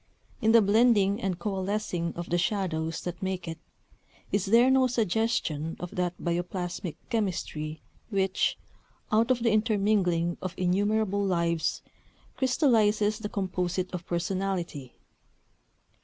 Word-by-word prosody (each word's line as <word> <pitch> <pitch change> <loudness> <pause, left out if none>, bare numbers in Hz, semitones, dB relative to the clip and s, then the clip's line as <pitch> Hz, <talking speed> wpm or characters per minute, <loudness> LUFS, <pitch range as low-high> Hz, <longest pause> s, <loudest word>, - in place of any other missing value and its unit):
In 220 - +4
the 230 -1 +7
blending 205 -1 +4
and 190 -2 -1
coalescing 190 -2 -2
of 175 0 -5
the 175 - +2
shadows 165 -5 -1
that 175 -1 -6
make 190 -2 -3
it, 165 0 -5 0.7
is 200 -2 0
there 235 +5 +5
no 265 -1 +4
suggestion 220 -9 0
of 180 - -6
that 180 -1 -2
bioplasmic 175 0 -3 0.2
chemistry 160 -8 -2 0.3
which, 195 -3 +1 0.5
out 225 +3 +3
of 250 -2 +2
the 230 - +3
intermingling 200 -6 +1
of 185 -1 -4
innumerable 200 +2 +1
lives, 170 -3 0 0.5
crystallizes 220 -6 +2
the 210 -2 -4
composite 185 -3 -2
of 175 -1 -5
personality? 175 -6 -3
190 Hz, 120 wpm, -28 LUFS, 175-215 Hz, 0.7 s, the